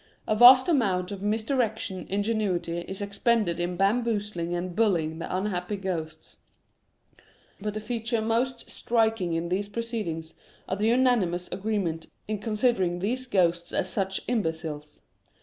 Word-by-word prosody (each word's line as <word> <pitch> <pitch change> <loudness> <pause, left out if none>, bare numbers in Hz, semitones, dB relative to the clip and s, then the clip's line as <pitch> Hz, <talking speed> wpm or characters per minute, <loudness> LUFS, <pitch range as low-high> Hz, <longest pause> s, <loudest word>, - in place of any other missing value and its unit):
A 215 - +2
vast 250 +3 +9
amount 195 - +1
of 200 -2 -6
misdirected 220 -2 -1
ingenuity 195 -5 -1
is 190 +3 -6
ex 200 0 -7
pended 215 -8 +2
in 175 0 -2
bamboozling 205 -4 0
and 175 0 -4
bullying 170 -7 +1
the 180 - -3
unhappy 190 0 -2
ghosts; 165 -5 -5 1.2
but 210 +1 -4
the - - -2
feature 230 +1 -2
most 235 +3 -1
striking 225 -7 0
in 165 +1 -2
these 200 +3 -1
pro 230 +3 -3
ceedings 170 -9 -4 0.4
is 190 - 0
the 215 - +2
unanimous 225 -8 +2
agreement 190 -6 -2 0.2
in 215 -1 -2
considering 210 -5 +1
these 250 +8 -2
ghosts 175 -5 +1
as 185 - -1
such 190 -1 -2
imbeciles. 160 -9 -3
200 Hz, 140 wpm, -27 LUFS, 175-225 Hz, 1.2 s, vast